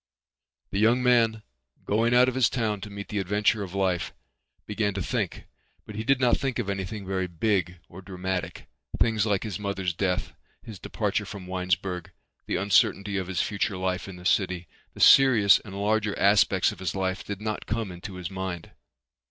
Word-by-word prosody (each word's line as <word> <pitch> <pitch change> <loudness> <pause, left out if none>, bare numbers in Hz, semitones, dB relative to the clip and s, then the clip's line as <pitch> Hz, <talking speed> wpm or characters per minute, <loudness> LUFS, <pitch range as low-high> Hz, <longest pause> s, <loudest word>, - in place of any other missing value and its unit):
The 100 - -1
young 120 +4 +3
man, 115 -3 +3 0.4
going 115 +3 +2
out 125 +1 +6
of 130 - 0
his 125 -3 +3
town 110 -5 -2
to 105 - -7
meet 100 0 -8
the 105 - -2
adventure 105 +3 +1
of 95 -1 -6
life, 95 -3 -1 0.5
began 105 -1 -1
to 100 - -2
think - - -2 0.4
but 110 - -9
he 110 +1 -4
did 135 +2 +2
not 125 -2 +3
think 135 -3 -2
of 105 -5 -2
anything 100 +1 -5
very 95 -1 -2
big 90 0 -1
or 95 - -11
dramatic. 95 0 -4 0.3
Things 110 -2 +2
like 100 -2 +1
his 110 -2 -5
mother's 95 -3 -2
death, 90 +1 -1 0.3
his 105 -4 -10
departure - - -2
from 95 -2 -8
Winesburg, 90 -1 -2 0.4
the - - -1
uncertainty 100 0 +2
of 95 -2 -3
his 90 -2 0
future 100 -1 -2
life 95 +2 -2
in 95 - -8
the 90 0 -12
city, 90 -3 +1 0.3
the - - -11
serious 120 -7 +7
and 100 -1 -9
larger 105 0 0
aspects 100 -1 +4
of - - -11
his 95 -2 -3
life 95 0 -2
did 100 -1 -6
not 105 0 -4
come 110 -2 -2
into 90 +2 -8
his 90 -1 -6
mind. 95 -3 -5
100 Hz, 185 wpm, -26 LUFS, 95-110 Hz, 0.5 s, serious